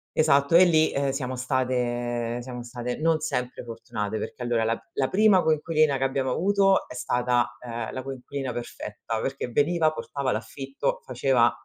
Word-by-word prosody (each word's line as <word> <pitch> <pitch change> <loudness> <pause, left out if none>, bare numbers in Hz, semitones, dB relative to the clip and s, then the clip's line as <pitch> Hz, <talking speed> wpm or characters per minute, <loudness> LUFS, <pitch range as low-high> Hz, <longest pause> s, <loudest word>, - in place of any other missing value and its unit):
Esatto, 140 0 +4
e 185 +2 +9
lì, 160 -2 +4
ehm, 140 0 0
siamo 130 -2 -3
state 120 -2 -1
siamo 125 -1 -7
state 120 0 -5
non 160 0 +2
sempre 125 -5 -3
fortunate, 110 -2 -4
perché 120 - -6
allora 120 -2 +1
la 115 +1 0
la 130 - +1
prima 205 -2 +5
coinquilina 155 -2 +2
che 135 - -2
abbiamo 135 0 0
avuto 195 +5 +2
è - - -9
stata, 125 -1 0
ehm, 115 -2 -5
la 130 - -5
coinquilina 135 -1 -5
perfetta, 115 -1 -5
perché 135 -1 -3
veniva, 155 +5 +2
portava 140 -4 -3
l'affitto, 140 - -3
faceva 125 - +2
130 Hz, 160 wpm, -26 LUFS, 120-155 Hz, -, e